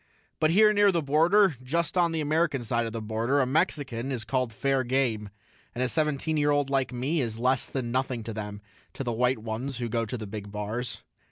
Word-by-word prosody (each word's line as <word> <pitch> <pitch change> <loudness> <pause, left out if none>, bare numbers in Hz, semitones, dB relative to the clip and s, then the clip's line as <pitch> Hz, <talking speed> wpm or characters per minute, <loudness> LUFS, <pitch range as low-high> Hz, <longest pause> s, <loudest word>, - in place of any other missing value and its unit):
But 155 - +3
here 210 +5 +5
near 205 -1 +5
the 170 -3 0
border, 165 +5 +4
just 160 +6 -1
on 175 -2 +3
the 160 -1 -1
American 150 -3 +1
side 115 0 0
of - - -5
the 115 0 -5
border, 115 +6 0
a 130 - +3
Mexican 135 -4 -1
is 120 -4 -2
called 125 +1 -1
fair 135 +4 0
game, 120 -5 0 0.5
and 125 - 0
a - - +2
seventeen 155 +2 0
year 145 0 +2
old 145 -1 +1
like 135 -1 +1
me 135 +6 -1
is 115 -3 -3
less 125 +2 +1
than 125 -3 -3
nothing 130 -2 -1
to 115 0 -5
them, 105 -1 -6 0.3
to - - -5
the 120 - -2
white 125 +2 +2
ones 115 +4 -4
who 120 -1 -2
go 115 0 -1
to 125 - -4
the 110 - -6
big 100 0 -7
bars. 105 +4 -4
130 Hz, 225 wpm, -27 LUFS, 115-150 Hz, 0.5 s, here